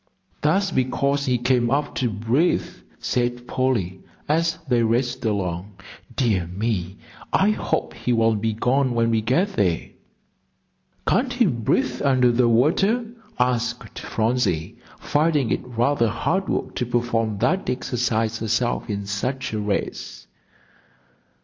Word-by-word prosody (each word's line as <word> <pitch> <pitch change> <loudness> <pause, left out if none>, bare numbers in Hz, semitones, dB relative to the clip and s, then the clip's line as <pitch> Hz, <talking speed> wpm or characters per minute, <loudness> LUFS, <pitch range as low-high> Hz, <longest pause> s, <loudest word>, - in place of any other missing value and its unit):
"That's 190 +6 +2
because 140 +2 0
he 125 -1 +2
came 120 0 +2
up 145 +2 0
to 125 - +1
breathe," 115 - +1 0.3
said 120 0 -1
Polly, 110 -9 0 0.3
as 165 +2 +1
they 120 -2 +3
raced 120 +3 0
along. 95 -2 -2 0.4
"Dear 105 -8 +1
me, 95 0 -2 0.3
I 200 +2 +4
hope - - -2
he 125 - -2
won't 115 -2 +2
be 110 0 0
gone 125 +3 +1
when 115 0 +2
we 110 -1 +2
get 130 - +1
there." 90 -7 0 1.2
"Can't 250 +1 +2
he 245 -1 +3
breathe 125 - 0
under 130 -3 +4
the 120 0 +3
water?" 190 - +3 0.3
asked 125 0 -1
Phronsie, 110 -4 -1 0.2
finding 150 -4 +1
it - - 0
rather 120 0 +1
hard 165 - -1
work - - -2
to 125 - 0
perform 115 -3 0
that 185 - +1
exercise 115 -3 -1
herself 115 +2 -1
in 100 -1 -3
such 115 +6 -3
a 110 - -1
race. 105 -1 -3
120 Hz, 130 wpm, -23 LUFS, 110-135 Hz, 1.2 s, I